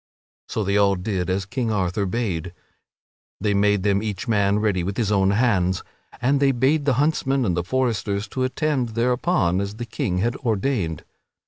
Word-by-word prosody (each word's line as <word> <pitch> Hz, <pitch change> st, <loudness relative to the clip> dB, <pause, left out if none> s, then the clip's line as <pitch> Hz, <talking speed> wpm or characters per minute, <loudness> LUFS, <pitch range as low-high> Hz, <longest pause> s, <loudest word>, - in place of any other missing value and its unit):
So 110 Hz, -, -1 dB
they 100 Hz, +1 st, +1 dB
all 100 Hz, -1 st, +4 dB
did 90 Hz, -1 st, -2 dB
as 95 Hz, +1 st, -1 dB
King 115 Hz, +3 st, -2 dB
Arthur 100 Hz, 0 st, 0 dB
bade; 90 Hz, -5 st, -3 dB, 0.8 s
they 105 Hz, +1 st, +1 dB
made 100 Hz, -1 st, +2 dB
them 100 Hz, -1 st, +2 dB
each 105 Hz, -2 st, -4 dB
man 100 Hz, -2 st, +2 dB
ready 105 Hz, -4 st, +1 dB
with 95 Hz, +3 st, -3 dB
his 110 Hz, -3 st, 0 dB
own 95 Hz, -2 st, +3 dB
hands, 100 Hz, -4 st, +1 dB, 0.4 s
and 135 Hz, +4 st, +2 dB
they 140 Hz, -1 st, +4 dB
bade 135 Hz, +4 st, +1 dB
the 140 Hz, -, +3 dB
huntsmen 140 Hz, -3 st, +1 dB
and 90 Hz, -5 st, +1 dB
the 85 Hz, -, -1 dB
foresters 110 Hz, -2 st, -1 dB
to 130 Hz, -, -4 dB
attend 130 Hz, -3 st, -1 dB
thereupon 120 Hz, -, +1 dB
as 100 Hz, +1 st, -4 dB
the 120 Hz, +2 st, -5 dB
King 110 Hz, -5 st, -2 dB
had 120 Hz, +6 st, 0 dB
ordained. 105 Hz, -, -1 dB
105 Hz, 180 wpm, -23 LUFS, 95-125 Hz, 0.8 s, all